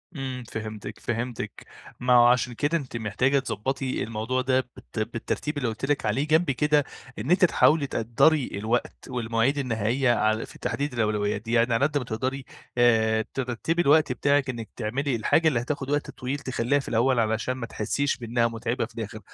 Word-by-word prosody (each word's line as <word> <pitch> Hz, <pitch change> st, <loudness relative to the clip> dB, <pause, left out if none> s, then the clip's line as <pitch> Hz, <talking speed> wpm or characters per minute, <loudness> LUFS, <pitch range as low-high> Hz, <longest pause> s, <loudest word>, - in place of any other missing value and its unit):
إمم 130 Hz, -3 st, -4 dB
فهمتِك، 110 Hz, -2 st, -6 dB
فهمتِك، 120 Hz, 0 st, -4 dB, 0.3 s
ما 125 Hz, 0 st, +2 dB
هو 120 Hz, -1 st, +7 dB
عشان 125 Hz, 0 st, +2 dB
كده 145 Hz, +7 st, 0 dB
أنتِ 130 Hz, -6 st, -6 dB
محتاجة 120 Hz, +6 st, +1 dB
تضبّطي 130 Hz, +2 st, -2 dB
الموضوع 115 Hz, +3 st, -2 dB
ده 130 Hz, 0 st, +1 dB
بالت 110 Hz, -, -8 dB
بالترتيب 115 Hz, +7 st, -3 dB
اللي 130 Hz, -4 st, -1 dB
قُلت 110 Hz, +4 st, -4 dB
لِك 145 Hz, -2 st, 0 dB
عليه، 130 Hz, +8 st, 0 dB
جنب 160 Hz, 0 st, +3 dB
كده 150 Hz, +2 st, +2 dB, 0.4 s
إن 145 Hz, -, -2 dB
أنتِ 185 Hz, +1 st, +6 dB
تحاولي 150 Hz, -3 st, +3 dB
تقدّري 125 Hz, +6 st, +2 dB
الوقت 110 Hz, +4 st, -1 dB
والمواعيد 115 Hz, +3 st, 0 dB
النهائية 120 Hz, 0 st, +1 dB
عل 110 Hz, -1 st, +1 dB
في -, -, -15 dB
تحديد 145 Hz, -1 st, -2 dB
الأولويات 105 Hz, -3 st, 0 dB
دي، 115 Hz, +2 st, -5 dB
يعني 120 Hz, 0 st, +3 dB
على 125 Hz, +5 st, +3 dB
قد 145 Hz, 0 st, 0 dB
ما 140 Hz, -, -1 dB
تقدري 130 Hz, +3 st, -3 dB, 0.3 s
آآ 110 Hz, -2 st, +3 dB
ترتّبي 135 Hz, +6 st, -1 dB
الوقت 150 Hz, -3 st, +4 dB
بتاعِك 140 Hz, +2 st, +1 dB
إنِك 115 Hz, -3 st, -5 dB
تعملي 125 Hz, +4 st, -1 dB
الحاجة 160 Hz, +8 st, +2 dB
اللي 125 Hz, -7 st, +2 dB
هتاخد 135 Hz, +1 st, -4 dB
وقت 145 Hz, 0 st, 0 dB
طويل 130 Hz, +3 st, -4 dB
تخلّيها 130 Hz, +1 st, 0 dB
في 135 Hz, -, -8 dB
الأول، 120 Hz, +2 st, +2 dB
علشان 110 Hz, +2 st, 0 dB
ما 130 Hz, -2 st, -5 dB
تحسيش 135 Hz, +6 st, -1 dB
بإنها 115 Hz, -1 st, 0 dB
مُتعِبة 115 Hz, +1 st, -2 dB
في 110 Hz, -, -17 dB
الآخر، 110 Hz, -1 st, -5 dB
125 Hz, 180 wpm, -26 LUFS, 115-140 Hz, 0.4 s, هو